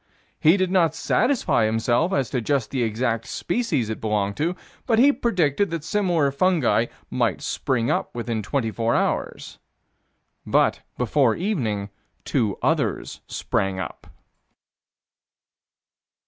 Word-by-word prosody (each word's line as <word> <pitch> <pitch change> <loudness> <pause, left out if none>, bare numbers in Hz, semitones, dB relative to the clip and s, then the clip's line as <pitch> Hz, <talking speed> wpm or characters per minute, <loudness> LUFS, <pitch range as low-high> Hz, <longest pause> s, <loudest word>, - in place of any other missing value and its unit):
He 160 +5 +5
did 185 -1 0
not 170 -4 +3
satisfy 245 - +1
himself 120 - +1
as 135 -9 0
to 125 - 0
just 130 -2 -1
the 130 - -1
exact 115 0 -1
species 220 - -1
it 110 - -5
belonged 105 -2 0
to, 165 +5 0 0.3
but 225 -3 +3
he 270 +5 +6
predicted 200 - +1
that 165 -2 -4
similar 175 -6 +1
fungi 140 -6 +2 0.2
might - - 0
spring 120 -3 0
up - - -2
within 115 -2 -2
twenty 115 +2 -1
four 115 +1 0
hours - - -2 0.8
But, - - +2 0.2
before 125 0 +2
evening, 110 - -2 0.3
two 110 -8 0
others - - -1
sprang 95 -1 -1
up. - - -7
135 Hz, 125 wpm, -23 LUFS, 115-180 Hz, 0.8 s, he